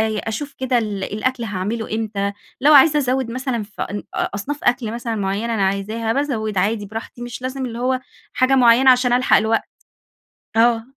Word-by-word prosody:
أ 215 - -3
أشوف 280 +6 -5
كده 260 -1 +1
ال 210 -4 -2
الأكل 235 +5 -2
هاعمله 215 +2 -3
إمتى، 205 -2 -2 0.3
لو 295 +3 +6
عايزة 295 +2 +7
أزوِد 260 -3 -1
مثلًا 255 -2 -2
في 205 0 -10
أن 205 0 -4
أ - - 0
أصناف 285 +9 -5
أكل 240 -3 +1
مثلًا 235 -1 -3
مُعيّنة 205 +3 -2
أنا 220 - -1
عايزاها، 215 +4 -2
بازوِد 225 -7 -2
عادي 205 +3 0
براحتي، 225 +3 -8
مش 240 0 -7
لازم 260 +1 -3
اللي 235 -1 -6
هو 255 +1 0 0.3
حاجة 255 +1 +3
مُعيّنة 255 +1 +6
عشان 250 -1 +3
ألحَق 250 +1 +4
الوقت. 220 +1 +1 1.0
آه. 230 0 +3
230 Hz, 180 wpm, -20 LUFS, 215-255 Hz, 1.0 s, عايزة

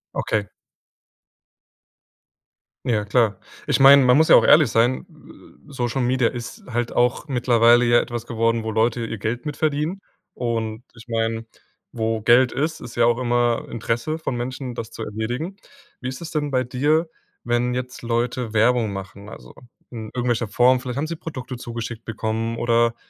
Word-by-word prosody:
Okay. 105 -2 -1 2.4
Ja, 105 -4 0
klar. 105 -2 +2 0.3
Ich - - +1
meine, 140 0 +8
man 125 +1 +5
muss 160 +1 +4
ja - - +8
auch - - +6
ehrlich 150 -4 +6
sein, 120 +3 +1
äh, - - -18
Social 125 -1 -2
Media 125 0 +2
ist 120 -1 -7
halt 120 -1 -2
auch 125 +5 0
mittlerweile 120 -1 +4
ja 120 0 +5
etwas 120 -1 -6
geworden, 115 0 0
wo 110 - -2
Leute 115 +2 +1
ihr 115 - -5
Geld 115 +5 -3
mit 150 -1 -4
verdienen 155 +5 -1 0.3
und 115 -2 -3
ich 115 +1 -15
meine, 115 -1 -1 0.5
wo 110 -1 -1
Geld 120 +3 +4
ist, 155 +3 -2
ist 120 0 -9
ja 120 - +4
auch 120 +1 +2
immer 120 -1 +1
Interesse 115 +7 -2
von 160 -5 -4
Menschen, 125 +1 -5
das 115 - -6
zu - - -7
erledigen. 120 - -4 0.5
Wie 130 - -3
ist 130 +3 -7
es 170 0 -7
denn 150 -3 -2
bei 130 -1 +1
dir, 150 +7 +1 0.4
wenn 120 +1 0
jetzt 125 0 -5
Leute 120 0 -2
Werbung 115 0 +2
machen? 100 +1 -8
Also, - - -12 0.4
in 115 -3 -6
irgendwelcher 120 -2 0
Form? 125 +5 +4
Vielleicht 125 0 -6
haben 145 - -1
sie 165 - -4
Produkte 130 -6 -7
zugeschickt 115 -1 -6
bekommen, 110 +1 -3
oder 115 0 +2
120 Hz, 170 wpm, -22 LUFS, 115-130 Hz, 2.4 s, meine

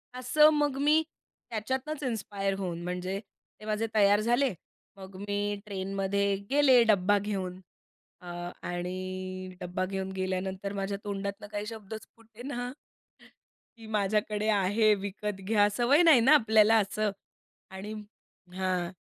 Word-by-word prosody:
असं, 280 +5 +5
मग 295 -2 +1
मी 305 +2 +5 0.5
त्याच्यातनंच 260 +7 -3
इन्स्पायर 200 -5 -2
होऊन, 175 -3 -3
म्हणजे 180 +2 -3 0.4
ते 215 - -11
माझे 215 +1 -1
तयार 205 -1 +5
झाले. 240 +3 +2 0.4
मग 190 0 -11
मी 205 0 -1
ट्रेनमध्ये 195 0 -1
गेले, 270 -4 +6
डब्बा 205 -2 +3
घेऊन 190 -3 -4 0.6
अ - - -10 0.4
आणि 185 +1 -5
डब्बा 180 +1 -2
घेऊन 190 0 -4
गेल्यानंतर 190 +1 -3
माझ्या 200 0 -2
तोंडातनं 200 0 -4
काही 205 0 -3
शब्दच 220 -1 -8
फुटेना 240 +3 -7 1.1
की 225 -1 -12
माझ्याकडे 210 0 0
आहे, 210 +2 +3
विकत 200 0 -5
घ्या. 205 0 +4
सवय 275 +7 +4
नाही 320 -7 +7
ना 265 +6 +6
आपल्याला 220 -3 +5
असं 210 +1 0 0.6
आणि 195 +3 -7 0.6
हां. 185 -2 -1
205 Hz, 125 wpm, -29 LUFS, 190-225 Hz, 1.1 s, नाही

